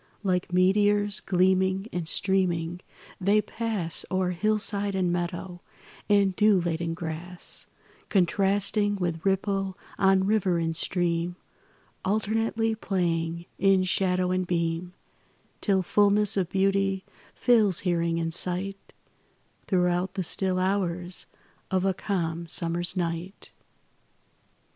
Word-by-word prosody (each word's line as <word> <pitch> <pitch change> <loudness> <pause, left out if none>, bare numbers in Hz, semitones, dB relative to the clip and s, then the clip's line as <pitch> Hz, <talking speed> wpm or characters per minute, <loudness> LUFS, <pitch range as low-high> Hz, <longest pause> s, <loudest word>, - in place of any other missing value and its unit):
Like 180 -2 0
meteors, 205 +3 +3
gleaming 190 +1 +1
and 175 -2 -3
streaming, 175 -2 0 0.4
they 200 +3 +3
pass 210 -6 -2
O'er 185 -1 0
hillside 205 +1 +1
and 180 -2 +1
meadow, 175 0 -4 0.5
and 200 -2 +3
dew 210 -2 +4
laden 165 -1 -2
grass, 175 +2 -5 0.4
Contrasting 200 +2 +2
with 175 -4 -3
ripple 195 -1 0 0.2
on 190 -1 +4
river 195 -4 +2
and 165 -1 -1
stream, 175 0 0 0.7
Alternately 225 +2 0
playing 170 -5 -2
in 195 0 +4
shadow 185 -1 +1
and 185 -1 -1
beam, 170 +1 -2 0.7
Till 195 -3 +2
fullness 205 +2 +3
of 185 -3 0
beauty 195 0 +1 0.3
fills 215 -7 +3
hearing 170 -2 0
and 165 0 -1
sight 185 +3 0 0.7
Throughout 180 0 +1
the 190 - -1
still 185 +2 +1
hours 185 -2 -1 0.4
of 190 0 0
a 195 - +2
calm 170 -4 -3
summer's 170 +2 0
night. 175 +2 -4
185 Hz, 110 wpm, -26 LUFS, 175-200 Hz, 0.7 s, dew